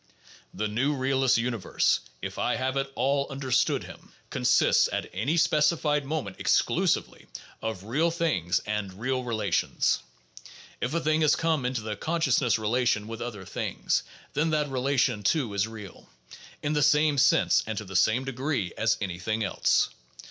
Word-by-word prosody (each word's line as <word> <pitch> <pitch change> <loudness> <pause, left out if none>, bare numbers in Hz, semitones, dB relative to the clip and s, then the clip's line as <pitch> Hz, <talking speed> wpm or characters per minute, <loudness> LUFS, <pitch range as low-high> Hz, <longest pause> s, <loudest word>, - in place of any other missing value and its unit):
The 110 - -2
new 130 +8 0
realist's 130 -1 +2
universe 115 -4 +1
— - - -33
if - - -5
I - - +1
have 130 +1 -2
at 135 0 -2
all 140 +1 +1
understood 135 -1 0
him - - -13
— - - -36
consists - - +3
at - - -2
any 125 - 0
specified 150 -2 +2
moment 135 -10 -4
exclusively - - +1 0.3
of 110 -4 -4
real 145 +11 +1
things 150 - 0
and 100 -3 -4
real 130 +2 -1
relations. 110 -7 0 0.8
If 125 +6 -2
a - - +2
thing 155 0 +1
has 155 - +4
come 160 -6 0
into 125 -2 -2
the 105 -1 -4
"consciousness 155 -5 +1
relation" 110 -1 0
with 115 0 -7
other 105 -5 -6
things, - - -1 0.3
then 155 +3 +1
that 150 -2 0
relation 130 -3 +1
too 115 +1 0
is 100 +2 0
real, 105 -4 -11 0.5
in 150 - 0
the 150 - +1
same 150 0 +4
sense 110 -10 +4
and 110 -1 -3
to 110 - -4
the 95 0 -9
same 110 +8 +3
degree 130 - -2
as 110 +1 +1
any 90 -3 -3
thing 110 +4 -1
else. 100 - +2
125 Hz, 165 wpm, -27 LUFS, 105-145 Hz, 0.8 s, has